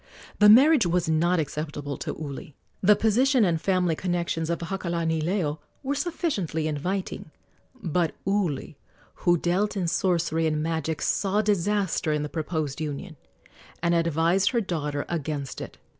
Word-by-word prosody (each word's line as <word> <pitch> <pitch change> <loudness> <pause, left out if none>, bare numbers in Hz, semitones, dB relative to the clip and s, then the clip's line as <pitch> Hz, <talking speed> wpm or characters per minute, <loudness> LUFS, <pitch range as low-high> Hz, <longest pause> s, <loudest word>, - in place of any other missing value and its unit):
The 210 0 +8
marriage 265 - +7
was 175 0 +1
not 170 +3 +2
acceptable 145 -1 -4
to - - -4
Uli. 145 -1 -7 0.3
The 205 +2 +6
position 240 +3 +3
and 165 -3 0
family 180 -4 +1
connections 170 -2 -2
of 170 - 0
Hakalanileo 170 -2 -1 0.2
were 275 +1 -1
sufficiently 270 - -2
inviting, 175 +4 -3 0.5
but 170 -1 0
Uli, 185 -8 -1 0.3
who 175 0 +2
dealt 190 +5 0
in 180 -3 0
sorcery 165 -2 +1
and 155 -1 0
magic, 160 -1 -2
saw 205 +2 +1
disaster 200 -4 +1
in 150 0 -1
the 150 - -4
proposed 155 -3 -3
union 155 +3 -5 0.7
and 170 0 +2
advised 170 +3 +2
her 240 - +1
daughter 150 -7 -3
against 150 -4 -4
it. - - -8
170 Hz, 140 wpm, -26 LUFS, 155-195 Hz, 0.7 s, The